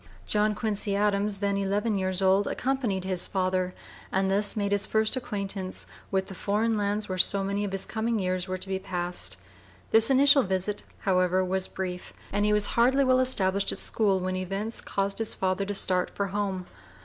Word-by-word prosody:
John 210 0 +2
Quincy 210 -2 -1
Adams, 205 0 +1
then 200 -1 0
eleven 205 +3 0
years 190 0 -1
old, 190 +2 +3
accompanied 245 -8 -1
his 185 -2 0
father 185 -1 -1 0.4
and 190 0 +1
thus 205 +2 +3
made 200 -1 -1
his 205 0 +1
first 220 +2 +3
acquaintance 200 -6 -4 0.2
with 190 -1 0
the 195 - -9
foreign 215 +4 0
lands 205 0 -1
where 185 -1 -4
so 195 +2 +4
many 200 +1 -1
of 200 - -3
his 195 0 -1
coming 225 0 -1
years 185 -1 -1
were 185 0 -3
to 185 - -7
be 190 0 -2
passed. 180 -2 -3 0.5
This 225 +2 +5
initial 275 +1 +6
visit, 190 0 -1 0.2
however, 185 -1 +2
was 190 +1 0
brief; 180 -1 -6 0.2
and 205 0 +1
he 210 - +2
was 210 -1 +2
hardly 260 +4 +4
well 255 -1 +3
established 200 -6 +1
at - - -5
school 200 -4 +2
when 185 0 -2
events 195 +4 -3
caused 195 +1 -2
his 225 - -2
father 190 +1 -1
to 205 +1 -3
start 185 -2 +1
for 200 -1 -3
home. 195 -2 -2
200 Hz, 190 wpm, -27 LUFS, 190-210 Hz, 0.5 s, initial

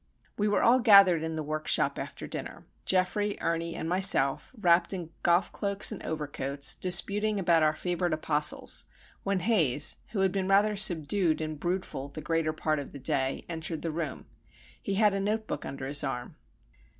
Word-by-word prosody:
We 210 - -1
were 205 - +1
all 245 +2 +5
gathered 200 -8 +6
in 160 0 -4
the 155 - -4
workshop 155 +1 0
after - - -7
dinner, - - -8 0.2
Geoffrey, 200 +3 0
Ernie, 165 0 -2
and - - -5
myself, 175 -7 +4
wrapped 175 -2 +2
in 175 -4 -6
golf 175 +2 +2
cloaks 200 +1 +1
and 215 - -7
overcoats, 145 -2 -2
disputing 205 +4 +1
about 170 -3 +2
our 155 0 +2
favourite 175 -1 -2
apostles, 150 -1 +1 0.3
when 195 -2 -2
Haze, 165 - +2
who 210 -3 -3
had 190 -1 +2
been 190 0 -2
rather 205 +2 +3
subdued 175 -3 +2
and 155 -1 -5
"broodful" 175 -6 -4
the - - -5
greater 165 0 -1
part 155 -1 -2
of 140 - -9
the 140 - -8
day, 135 0 -2
entered 160 -1 -5
the 165 - -2
room. 155 -4 -5 0.6
He 195 - -3
had 210 0 +3
a 195 - -2
notebook 215 +2 -3
under 135 -1 -7
his 145 +2 +2
arm. 125 -3 -5
170 Hz, 175 wpm, -28 LUFS, 155-195 Hz, 0.6 s, gathered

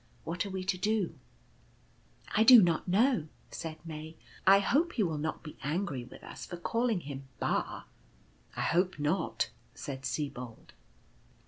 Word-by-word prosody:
What 175 +4 -2
are - - -6
we 190 -1 -3
to 185 -1 -1
do? 210 -2 +1 0.6
" - - -16
"I 220 - +6
do 245 +1 +11
not 170 0 +1
know," 210 - +3 0.2
said 160 -1 -5
May; 160 0 -7 0.3
"I 195 +1 +9
hope 290 - +2
he 220 - +2
will 160 -5 -1
not 155 +1 -3
be 155 - -9
angry 145 -5 -2
with - - -13
us - - -9
for 175 - -6
calling 230 +2 0
him 140 -2 -7
' 120 - -33
Ba/ - - -1 0.2
" - - -32
" - - -28
I - - -1
hope 180 +3 +2
not," 160 +4 0 0.2
said 135 -2 -6
Sibold. 125 -6 -4
170 Hz, 175 wpm, -31 LUFS, 150-200 Hz, 0.6 s, do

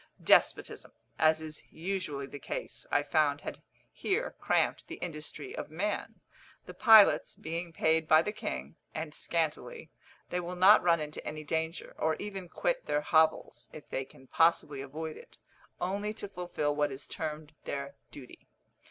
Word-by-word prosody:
Despotism, - - +3 0.3
as 160 0 +4
is 155 -1 -8
usually 165 -5 -3
the 145 +1 -9
case, - - -6
I - - +3
found - - +2
had - - -7 0.3
here 435 +6 -1
cramped - - +1
the 335 - -6
industry 155 - -6
of - - -5
man. 195 +7 -3 0.4
The - - -9
pilots 220 -3 +6
being 170 +2 -4
paid 160 0 +2
by 155 +1 +6
the 210 - -2
king, 70 - -5 0.2
and 160 -1 -4
scantily, 170 - -2 0.4
they 180 - 0
will 180 +1 -5
not 190 +4 +7
run 170 -2 +3
into 150 0 -6
any 155 0 -5
danger, 160 +2 -3
or 160 0 +2
even 195 -2 -6
quit - - -1
their 150 - +1
hovels, 160 +1 +2
if 155 - -11
they 135 - -2
can 130 0 -17
possibly 150 -2 +2
avoid 155 +3 -6
it, - - -15 0.4
only 205 +4 -2
to 205 - -6
fulfil 175 -6 -2
what 145 -1 +1
is 135 +1 -7
termed 155 -1 -5
their 140 0 -4 0.2
duty. 130 -3 -13
160 Hz, 160 wpm, -31 LUFS, 150-185 Hz, 0.4 s, not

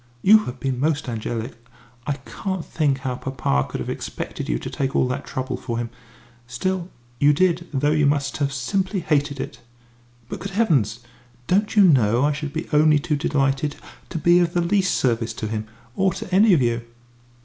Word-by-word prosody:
You 215 +2 +6
have 125 +1 -6
been 130 0 -2
most 145 0 0
angelic. 115 +1 -4 0.5
I 145 - +1
can't 180 - -5
think 145 -4 0
how 130 -2 -2
papa 95 - -1
could - - -4
have - - -4
expected - - -5
you - - +1
to - - -7
take 135 -1 -2
all - - +3
that 130 +3 -4
trouble 130 -1 -3
for 120 -2 -4
him 120 -1 -3 0.6
still, 175 +8 -2 0.3
you 145 +1 +5
did, 175 +1 +1
though 145 +1 +1
you 150 -2 +3
must 140 -1 0
have 140 -1 0
simply 185 +8 -1
hated 145 -3 0
it." - - -6 0.7
"But, - - -6
good 195 0 -6
heavens! 135 - +1 0.4
don't 205 - +1
you 205 - +7
know 125 - +4
I 150 - +2
should 150 0 -4
be 160 +2 -4
only 155 0 +5
too 150 +1 -1
delighted 140 0 0 0.3
to 170 - -4
be 175 +3 +5
of 175 -1 +1
the 175 - +3
least 185 +2 +2
service 115 -2 0
to 110 - -4
him 110 0 -4 0.3
or 190 -1 +2
to 180 - -7
any 200 0 +6
of 135 - +2
you?" 120 0 0
145 Hz, 195 wpm, -23 LUFS, 125-175 Hz, 0.7 s, you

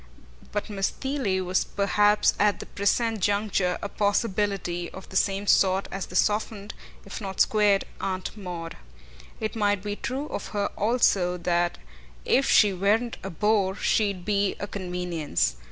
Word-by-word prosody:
But 205 - -2
Miss 200 -2 -1
Theale 255 -9 -2
was 185 +1 +1
perhaps 205 +1 +2
at 205 0 +3
the - - -7
present 225 +3 0
juncture 200 -2 +1
a - - -1
possibility 200 -4 -1
of 190 - -11
the 190 - -11
same 195 +1 +1
sort 190 -1 +3
as 195 0 -4
the 180 - -11
softened, 210 0 0 0.3
if 200 - -7
not 195 -2 -5
the - - +1
squared, 205 -2 +2
Aunt 185 0 -3
Maud. 175 -5 -7 0.6
It 215 +1 -3
might 205 -3 +1
be 205 0 -3
true 265 +7 -4
of - - -5
her 200 - 0
also 200 -5 +2
that 175 0 0 0.5
if 270 - +3
she 205 -2 +5
weren't 210 +6 +1
a 195 - -5
bore 195 +1 +1
she'd 200 -4 0
be 200 -1 +1
a - - -3
convenience. 175 - -2
200 Hz, 155 wpm, -26 LUFS, 185-210 Hz, 0.6 s, she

